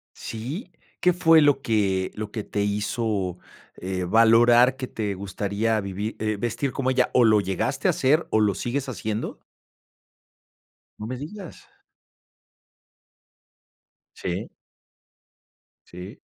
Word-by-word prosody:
¿Sí? 140 - -6 0.3
¿Qué 180 - +4
fue 165 -2 +5
lo 145 -2 +3
que 95 -5 0
lo 105 -1 -5
que 110 -1 -5
te 105 - -2
hizo, 105 -2 -1 0.4
eh, 95 0 -3
valorar 120 +5 +5
que 130 -1 -5
te 105 -5 -3
gustaría 100 +3 -1
vivir 100 +2 -5
eh, 110 -1 -1
vestir 120 +4 -2
como 130 -2 -1
ella? 130 - +2
¿O 125 - +5
lo 110 -1 +5
llegaste 95 -2 -1
a - - +6
hacer, 150 +5 +2
o 110 - +3
lo 105 -2 +2
sigues 130 +7 -3
haciendo? 110 -2 -4 1.6
No 105 - -6
me 130 +2 -4
digas. 170 +6 -9 2.5
Sí. - - -4 1.4
Sí. 90 +2 -10
110 Hz, 120 wpm, -24 LUFS, 100-130 Hz, 2.5 s, a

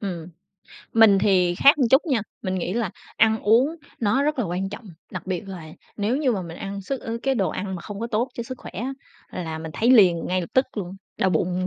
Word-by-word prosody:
Ừm, 175 -5 -5 0.6
mình 220 -3 +6
thì 185 -3 +3
khác 280 +11 +6
một 255 -5 +2
chút 265 +4 +5
nha, 260 -7 +1 0.2
mình 185 -2 -2
nghĩ 180 -1 -2
là 230 -6 -1 0.3
ăn 220 0 +3
uống 250 +10 +3 0.2
nó 230 +5 +2
rất 300 -1 0
là 240 - +1
quan 180 +2 -2
trọng, 205 +4 -9 0.3
đặc - - -7
biệt 190 +2 -3
là 180 -4 -7 0.3
nếu 215 +5 0
như 280 -4 +1
mà 195 -4 -2
mình 170 -1 -8
ăn 200 0 -5
sức 260 +7 -4
ờ, 230 0 -4
cái 270 0 +1
đồ 195 -6 +1
ăn 190 -1 -4
mà 170 - -7
không 205 +1 -7
có 230 - -2
tốt 235 +2 0
cho 235 - -4
sức 255 +2 -8
khỏe - - -10
á, 250 +7 -4 0.5
là 160 0 -4
mình 160 0 -6
thấy 235 - +2
liền 185 -9 +5
ngay 185 0 0
lập 170 - -6
tức 260 +1 +4
luôn, 190 -1 -5 0.2
đau 190 - +2
bụng. 185 +1 0
205 Hz, 245 wpm, -24 LUFS, 185-240 Hz, 0.6 s, mình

